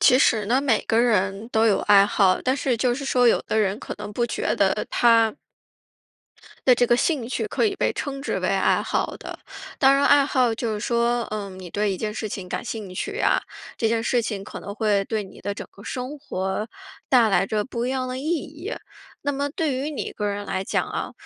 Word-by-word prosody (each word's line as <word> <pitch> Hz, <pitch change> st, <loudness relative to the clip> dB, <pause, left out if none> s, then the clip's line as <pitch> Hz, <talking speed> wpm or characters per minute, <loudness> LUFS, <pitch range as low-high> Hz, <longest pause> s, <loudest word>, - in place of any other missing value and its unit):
其 255 Hz, -2 st, +6 dB
实 220 Hz, -6 st, +3 dB
呢， 250 Hz, +5 st, +3 dB
每 255 Hz, -6 st, +2 dB
个 225 Hz, -, +2 dB
人 210 Hz, -2 st, +1 dB
都 225 Hz, 0 st, +3 dB
有 210 Hz, -, +3 dB
爱 200 Hz, -1 st, +6 dB
好。 195 Hz, -2 st, +3 dB
但 260 Hz, +1 st, +1 dB
是 260 Hz, -3 st, 0 dB
就 245 Hz, +1 st, +1 dB
是 275 Hz, -, -5 dB
说 250 Hz, -2 st, +3 dB
有 -, -, +3 dB
的 220 Hz, -, -1 dB
人 205 Hz, -1 st, +1 dB
可 -, -, -6 dB
能 210 Hz, 0 st, -7 dB
不 235 Hz, +3 st, 0 dB
觉 -, -, -1 dB
得 -, -, +2 dB
他 230 Hz, -2 st, +4 dB, 1.3 s
的 255 Hz, -, +7 dB
这 245 Hz, -, +3 dB
个 240 Hz, 0 st, +3 dB
兴 255 Hz, -3 st, 0 dB
趣 -, -, -2 dB
可 -, -, 0 dB
以 400 Hz, -3 st, 0 dB
被 -, -, +1 dB
称 275 Hz, -2 st, -4 dB
之 290 Hz, -, -2 dB
为 -, -, 0 dB
爱 -, -, +2 dB
好 -, -, -2 dB
的。 -, -, -8 dB, 0.4 s
当 270 Hz, 0 st, +6 dB
然 280 Hz, -, +2 dB
爱 285 Hz, -1 st, +5 dB
好 255 Hz, -5 st, +2 dB
就 225 Hz, -1 st, -2 dB
是 210 Hz, -, -4 dB
说， 235 Hz, +1 st, +1 dB
呃， 210 Hz, -2 st, -4 dB
你 185 Hz, -2 st, -10 dB
对 205 Hz, +1 st, 0 dB
一 -, -, -3 dB
件 210 Hz, +2 st, -3 dB
事 215 Hz, 0 st, -4 dB
情 190 Hz, -2 st, -6 dB
感 -, -, -4 dB
兴 215 Hz, -5 st, -6 dB
趣 185 Hz, -, -4 dB
啊， -, -, +3 dB, 0.4 s
这 225 Hz, -, 0 dB
件 225 Hz, 0 st, +1 dB
事 245 Hz, +1 st, +2 dB
情 210 Hz, -3 st, -4 dB
可 195 Hz, -, -8 dB
能 200 Hz, -, -7 dB
会 205 Hz, -2 st, +1 dB
对 215 Hz, 0 st, -2 dB
你 190 Hz, -, -13 dB
的 205 Hz, -, -3 dB
整 -, -, -7 dB
个 200 Hz, -, -15 dB
生 255 Hz, +5 st, -5 dB
活 190 Hz, -5 st, -3 dB, 0.4 s
带 245 Hz, -4 st, +5 dB
来 195 Hz, -1 st, +2 dB
着 210 Hz, +1 st, -1 dB
不 240 Hz, -2 st, -3 dB
一 -, -, -1 dB
样 260 Hz, -1 st, -2 dB
的 255 Hz, 0 st, -4 dB
意 270 Hz, -, -6 dB
义。 335 Hz, -, -3 dB, 0.5 s
那 285 Hz, -, 0 dB
么 285 Hz, 0 st, -1 dB
对 300 Hz, -1 st, -1 dB
于 280 Hz, +4 st, -2 dB
你 285 Hz, -, -4 dB
个 210 Hz, -, -3 dB
人 205 Hz, 0 st, -3 dB
来 190 Hz, -1 st, -3 dB
讲 -, -, 0 dB
啊， -, -, -4 dB
230 Hz, 250 characters per minute, -24 LUFS, 205-260 Hz, 1.3 s, 的